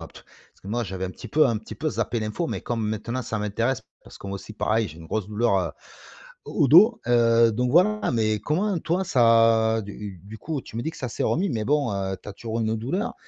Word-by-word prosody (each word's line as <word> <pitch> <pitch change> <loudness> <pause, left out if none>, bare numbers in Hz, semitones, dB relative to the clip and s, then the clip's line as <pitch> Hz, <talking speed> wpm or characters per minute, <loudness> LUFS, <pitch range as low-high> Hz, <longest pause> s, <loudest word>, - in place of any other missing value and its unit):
parce - - -16
que - - -15
moi, 120 +4 -1
j'avais 95 -3 -4
un 95 - -4
petit - - -10
peu 150 0 +4
un 115 -4 0
petit 110 - -10
peu 155 - -1
zappé 120 - -2
l'info, 110 +10 -3
mais - - -3
comme 115 -2 -3
maintenant 115 +4 -3
ça 110 - -3
m'intéresse 115 +4 -1 0.2
parce - - -14
que - - -10
moi 100 - -4
aussi, 100 - -8
pareil, 110 +1 0
j'ai 80 +1 -12
une 80 - -11
grosse 105 +2 -3
douleur, 110 -1 +1
heu, 85 -4 -2 0.7
au - - +1
dos, 215 - +7
heu, 115 -1 +4
donc, 125 +3 0
voilà. 205 +7 +3
Mais 110 -2 +1
comment 185 - 0
toi, 175 +5 0
ça 115 -5 +4
du 100 0 -9
coup, 155 -3 -3
tu - - -14
me 115 - -2
dis 160 - -2
que - - -14
ça 130 - -4
s'est - - -4
remis 190 +5 +1
mais 110 -5 -2
bon, 140 -3 +1
heu, 95 -1 -2
tu - - -10
as - - -6
toujours 115 +2 -5
une 110 0 0
douleur? 185 - -2
115 Hz, 240 wpm, -24 LUFS, 105-140 Hz, 0.7 s, dos